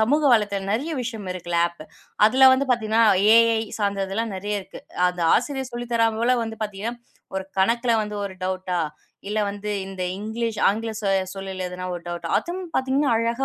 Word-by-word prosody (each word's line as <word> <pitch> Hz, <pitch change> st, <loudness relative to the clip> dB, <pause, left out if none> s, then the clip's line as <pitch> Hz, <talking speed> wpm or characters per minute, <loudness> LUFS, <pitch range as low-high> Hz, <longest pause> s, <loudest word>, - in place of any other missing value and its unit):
சமூக 285 Hz, +8 st, +3 dB
வலைத்த 205 Hz, -3 st, +1 dB
ம் 195 Hz, -, -4 dB
நிறைய 280 Hz, +10 st, -1 dB
விஷயம் 225 Hz, -5 st, -5 dB
இருக்குல 175 Hz, -1 st, -2 dB
அப். 170 Hz, -2 st, -13 dB, 0.4 s
அதுல 260 Hz, +4 st, +7 dB
வந்து 270 Hz, +2 st, +2 dB
பாத்தீங்கன்னா 225 Hz, -1 st, +2 dB, 0.3 s
ஏ.ஐ. 230 Hz, -1 st, +4 dB, 0.2 s
சார்ந்ததுலாம் 200 Hz, +1 st, -1 dB
நிறைய 205 Hz, +2 st, -2 dB
இருக்கு. -, -, -12 dB, 0.3 s
அந்த 180 Hz, 0 st, -5 dB
ஆசிரியர் 265 Hz, +1 st, -1 dB
சொல்லித்தராமலா 235 Hz, 0 st, +1 dB
வந்து 225 Hz, -1 st, -7 dB
பாத்தீங்கன்னா 210 Hz, +3 st, -4 dB, 0.4 s
ஒரு 190 Hz, 0 st, -2 dB
கணக்குல 235 Hz, +5 st, +2 dB
வந்து 210 Hz, 0 st, -5 dB
ஒரு 195 Hz, -, -5 dB
டவுட்டா 185 Hz, -1 st, -2 dB, 0.5 s
இல்ல 210 Hz, +1 st, -1 dB
வந்து 205 Hz, +1 st, -5 dB
இந்த 190 Hz, -1 st, -6 dB
இங்கிலீஷ் 220 Hz, +2 st, -3 dB
ஆங்கில 225 Hz, +3 st, -1 dB
சொல் 195 Hz, -2 st, 0 dB
சொல்லில் 185 Hz, -2 st, -5 dB
ஒரு 175 Hz, -, -7 dB
டவுட்டா 175 Hz, 0 st, -4 dB
அதுவும் 350 Hz, +2 st, -5 dB
பாத்தீங்கன்னா 265 Hz, 0 st, +2 dB
அழகா 230 Hz, +3 st, 0 dB
215 Hz, 160 wpm, -23 LUFS, 195-235 Hz, 0.5 s, அதுல